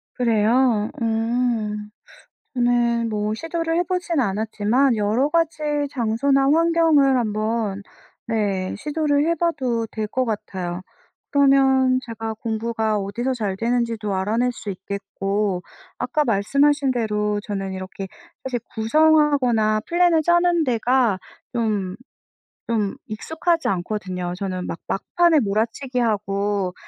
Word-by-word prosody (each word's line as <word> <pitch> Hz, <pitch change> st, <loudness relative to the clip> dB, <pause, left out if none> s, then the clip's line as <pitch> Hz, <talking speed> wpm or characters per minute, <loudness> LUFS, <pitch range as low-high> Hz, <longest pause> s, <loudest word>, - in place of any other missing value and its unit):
그래요? 230 Hz, -1 st, +2 dB
음 225 Hz, -2 st, -1 dB, 0.6 s
네. 240 Hz, -2 st, +2 dB
뭐 210 Hz, -1 st, -1 dB
시도를 330 Hz, +3 st, -2 dB
해보진 355 Hz, -3 st, 0 dB
않았지만 220 Hz, +4 st, +1 dB
여러 220 Hz, +7 st, +1 dB
가지 330 Hz, -1 st, 0 dB, 0.3 s
장소나 265 Hz, +3 st, +1 dB
환경을 320 Hz, -4 st, +4 dB
한번 215 Hz, -2 st, -1 dB, 0.8 s
네. -, -, -4 dB
시도를 295 Hz, -1 st, 0 dB
해 335 Hz, -, +2 dB
봐도 260 Hz, -9 st, 0 dB
될 215 Hz, -1 st, -3 dB
것 255 Hz, +4 st, -1 dB
같아요. 190 Hz, -5 st, -4 dB, 0.5 s
그러면 265 Hz, -2 st, +4 dB
제가 225 Hz, -1 st, -5 dB
공부가 220 Hz, -1 st, -1 dB
어디서 235 Hz, +7 st, -2 dB
잘 205 Hz, -6 st, -2 dB
되는지도 230 Hz, -2 st, -1 dB
알아낼 220 Hz, +6 st, +1 dB
수 220 Hz, -3 st, -8 dB
있겠고 195 Hz, 0 st, -3 dB, 0.4 s
아까 300 Hz, -, 0 dB
말씀하신 275 Hz, +6 st, +2 dB
대로 210 Hz, -3 st, -1 dB
저는 195 Hz, -3 st, -4 dB
이렇게 190 Hz, +1 st, -6 dB, 0.4 s
사실 255 Hz, -2 st, -2 dB
구성하거나 250 Hz, -4 st, +3 dB
플랜을 345 Hz, -2 st, +3 dB
짜는 345 Hz, 0 st, +3 dB
데가 240 Hz, -5 st, +2 dB, 0.3 s
좀, 210 Hz, -6 st, -1 dB, 0.7 s
좀 215 Hz, -4 st, 0 dB
익숙하지 320 Hz, +9 st, -1 dB
않거든요. 180 Hz, -1 st, -3 dB
저는 185 Hz, -2 st, -3 dB
막 -, -, -5 dB
막판에 340 Hz, -, +2 dB
몰아치기하고 210 Hz, -4 st, -1 dB
230 Hz, 250 characters per minute, -22 LUFS, 210-275 Hz, 0.8 s, 환경을